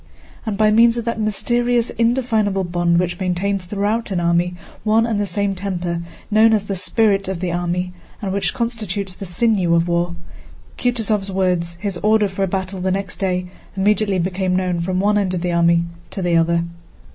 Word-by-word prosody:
And 205 -2 -1
by 215 0 +4
means 230 +2 +5
of 235 - -3
that 230 -1 -2
mysterious 240 +3 +1
indefinable 230 -5 +1
bond 175 -1 +1
which 175 0 -1
maintains 185 +1 -1
throughout 210 +5 -1
an 190 -3 -1
army 170 +1 +1 0.3
one 220 +1 +3
and 225 -3 -1
the 205 - 0
same 200 0 0
temper, 180 -3 -3 0.3
known 220 +1 +5
as 210 -2 +2
"the 200 -1 -3
spirit 195 +2 +1
of 190 -2 -3
the 180 -1 -2
army," 175 +1 -2 0.3
and 195 -4 -3
which 200 - 0
constitutes 215 -5 -2
the 195 +1 -8
sinew 180 -2 +2
of 170 +1 +2
war, 175 0 0 0.6
Kutúzov's 220 -5 0
words, 180 -3 0
his 200 -2 -2
order 215 +2 +3
for 190 0 -5
a 195 - +2
battle 190 0 -3
next 190 +1 -2
day, 180 -2 -1 0.3
immediately 200 0 +2
became 185 +1 0
known 180 -2 0
from 185 +1 -1
one 205 +1 +3
end 185 -2 0
of 175 - -2
the 180 0 -1
army 170 0 +3 0.3
to 190 - -4
the 175 -1 +2
other. 170 0 +3
190 Hz, 185 wpm, -20 LUFS, 180-215 Hz, 0.6 s, means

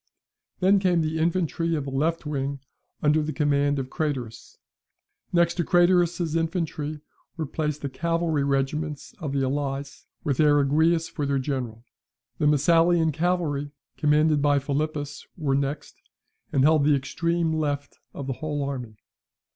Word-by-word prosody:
Then 195 +2 +5
came 180 -3 +2
the 160 0 -1
infantry 165 0 0
of 145 -3 -2
the 135 - -5
left 155 +5 0
wing, 140 -1 -2 0.4
under 150 +1 +4
the 150 +1 -2
command 145 -1 +1
of 130 -1 -4
Craterus. 135 -8 -4 0.7
Next 170 -1 +3
to 175 - +1
Craterus's 175 -2 +3
infantry 160 -3 -2 0.4
were 160 - -2
placed 150 0 -3
the - - 0
cavalry 165 0 0
regiments 140 +2 -2
of 150 -3 -4
the 140 -1 0
allies, 140 +1 -3 0.2
with 140 -3 -1
Eriguius 155 +3 +3
for 145 -2 -3
their 140 0 +1
general. 130 -5 -3 0.6
The 150 - +3
Messalian 165 +3 +4
cavalry, 155 -3 -1 0.2
commanded 150 0 +3
by 145 0 +3
Philippus, 145 +1 -3
were 145 -5 0
next, 140 +1 -2 0.5
and 135 - +2
held 155 0 +5
the 145 0 +4
extreme 165 +4 -1
left 145 -2 -2
of 140 - -7
the 135 - -2
whole 145 +1 -3
army. 125 -6 -5
150 Hz, 145 wpm, -25 LUFS, 140-165 Hz, 0.7 s, Then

